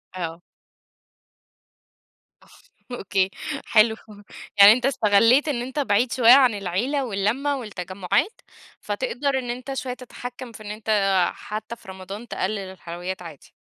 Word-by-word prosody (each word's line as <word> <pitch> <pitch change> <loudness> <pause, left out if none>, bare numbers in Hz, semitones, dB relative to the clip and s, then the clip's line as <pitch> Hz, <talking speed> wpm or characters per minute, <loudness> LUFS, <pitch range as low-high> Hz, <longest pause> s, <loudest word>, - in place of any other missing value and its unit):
آه. 170 -1 -5 2.5
أوكي 195 -5 0 0.4
حلو، 220 0 +4 0.6
يعني 200 +1 +10
أنت 250 +2 -2
اِستَغَلّيت 230 +2 +4
إن 270 -6 -1
أنت 260 +4 -4
بعيد 235 -2 +1
شوية 240 -2 +5
عن 255 -4 +6
العيلة 210 +9 -1
واللّمّة 240 +7 -1
والتّجمُّعات، 200 - -2 0.4
فتقدر 280 - -2
إن 245 -2 -6
أنت 255 +3 -5
شوية 260 -1 -4
تتحكّم 250 0 -9
في 220 - -12
إن 205 - -6
أنت 215 +1 -8 0.4
حتى 215 +2 -7
في 235 - -21
رمضان 190 +4 -8
تقلِّل 210 -1 -2
الحلويات 185 -1 -7
عادي. 165 -5 -12
220 Hz, 125 wpm, -23 LUFS, 195-255 Hz, 2.5 s, يعني